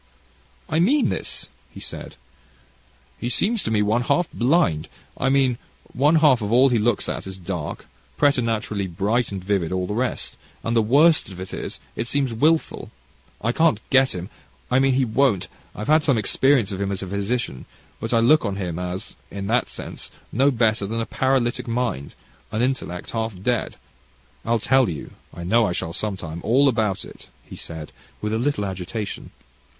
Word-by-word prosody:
"I 160 Hz, -, 0 dB
mean 255 Hz, -, +3 dB
this," -, -, -2 dB, 0.2 s
he -, -, -11 dB
said: -, -, -6 dB, 1.0 s
"he 120 Hz, -, -2 dB
seems 205 Hz, -, +1 dB
to -, -, -3 dB
me, 105 Hz, -2 st, +2 dB
one 110 Hz, +4 st, +2 dB
half, 175 Hz, +7 st, +1 dB
blind 125 Hz, -, +2 dB, 0.3 s
I 135 Hz, -, 0 dB
mean 135 Hz, -3 st, +2 dB, 0.3 s
one 145 Hz, +6 st, +4 dB
half 150 Hz, -6 st, +5 dB
of 105 Hz, 0 st, -2 dB
all 130 Hz, +3 st, +6 dB
he 120 Hz, -3 st, +2 dB
looks 110 Hz, 0 st, +1 dB
at -, -, -4 dB
is 95 Hz, -1 st, -7 dB
dark 85 Hz, -4 st, -5 dB, 0.3 s
preternaturally 115 Hz, -7 st, +1 dB
bright 105 Hz, +7 st, 0 dB
and 95 Hz, -2 st, -5 dB
vivid 95 Hz, -4 st, 0 dB
all 95 Hz, 0 st, 0 dB
the 105 Hz, -, -3 dB
rest; 125 Hz, +3 st, -2 dB, 0.3 s
and 115 Hz, -, -1 dB
the 115 Hz, -, +5 dB
worst 145 Hz, +8 st, +4 dB
of 95 Hz, -2 st, -10 dB
it 95 Hz, 0 st, -7 dB
is, -, -, -5 dB, 0.2 s
it 115 Hz, -, -3 dB
seems 135 Hz, -2 st, 0 dB
wilful. 155 Hz, +8 st, +1 dB, 0.5 s
I 115 Hz, -, +1 dB
can't 160 Hz, -5 st, +3 dB
get 130 Hz, -3 st, +4 dB
him 90 Hz, +4 st, -6 dB, 0.4 s
I 125 Hz, -, +5 dB
mean 135 Hz, 0 st, +3 dB
he 130 Hz, 0 st, +3 dB
won't 115 Hz, -4 st, +2 dB, 0.3 s
I've 105 Hz, -, -5 dB
had 155 Hz, +2 st, +4 dB
some 140 Hz, -6 st, +3 dB
experience 120 Hz, +1 st, +2 dB
of 95 Hz, 0 st, -4 dB
him 100 Hz, 0 st, -1 dB
as 100 Hz, 0 st, -3 dB
a -, -, -5 dB
physician, 100 Hz, -, -2 dB, 0.3 s
but 115 Hz, -, -4 dB
I 120 Hz, -, +4 dB
look 150 Hz, +7 st, +5 dB
on 100 Hz, -4 st, -1 dB
him 90 Hz, -4 st, -3 dB
as, 90 Hz, +3 st, -5 dB
in 100 Hz, 0 st, -5 dB
that 125 Hz, -, +2 dB
sense, -, -, -7 dB, 0.2 s
no 135 Hz, +5 st, +4 dB
better 110 Hz, -5 st, +1 dB
than 115 Hz, +3 st, -2 dB
a 115 Hz, -, -1 dB
paralytic 130 Hz, -2 st, 0 dB
mind, 115 Hz, -, -2 dB, 0.4 s
an 110 Hz, +2 st, 0 dB
intellect 125 Hz, -9 st, -2 dB
half 110 Hz, -4 st, -3 dB
dead. 120 Hz, +4 st, -1 dB, 0.7 s
I'll 115 Hz, +1 st, +2 dB
tell 130 Hz, +1 st, +3 dB
you 80 Hz, -4 st, -6 dB, 0.2 s
I 85 Hz, -, -8 dB
know 110 Hz, +5 st, +3 dB
I 90 Hz, -, -1 dB
shall 85 Hz, -1 st, -3 dB
some 105 Hz, +1 st, -2 dB
time 85 Hz, -1 st, -6 dB
all 130 Hz, +6 st, +4 dB
about 110 Hz, -6 st, 0 dB
it," -, -, -14 dB
he -, -, -11 dB
said, 80 Hz, -2 st, -7 dB, 0.3 s
with 105 Hz, 0 st, -2 dB
a 110 Hz, -, +1 dB
little 125 Hz, -5 st, 0 dB
agitation. 95 Hz, +3 st, -5 dB
115 Hz, 185 wpm, -23 LUFS, 100-130 Hz, 1.0 s, all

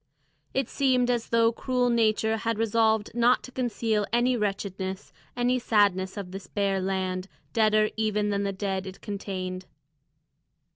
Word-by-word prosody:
It 270 Hz, -2 st, +1 dB
seemed 255 Hz, -3 st, +2 dB
as 235 Hz, -2 st, -2 dB
though 230 Hz, 0 st, +4 dB
cruel 250 Hz, +1 st, 0 dB
nature 220 Hz, -1 st, +2 dB
had 230 Hz, 0 st, -1 dB
resolved 220 Hz, -1 st, +2 dB
not 240 Hz, +1 st, +3 dB
to 255 Hz, -, -10 dB
conceal 230 Hz, -4 st, -1 dB
any 240 Hz, +2 st, +3 dB
wretchedness, 195 Hz, -3 st, -3 dB, 0.2 s
any 245 Hz, +1 st, +2 dB
sadness 200 Hz, -4 st, +2 dB
of 190 Hz, -3 st, -6 dB
this 195 Hz, 0 st, -8 dB
bare 195 Hz, -2 st, 0 dB
land, 185 Hz, -1 st, -2 dB, 0.3 s
deader 215 Hz, -1 st, +4 dB
even 210 Hz, -1 st, 0 dB
than 200 Hz, 0 st, 0 dB
the 200 Hz, 0 st, -1 dB
dead 195 Hz, -1 st, -3 dB
it 190 Hz, -, -9 dB
contained. 185 Hz, -3 st, -5 dB
215 Hz, 145 wpm, -27 LUFS, 195-235 Hz, 0.3 s, though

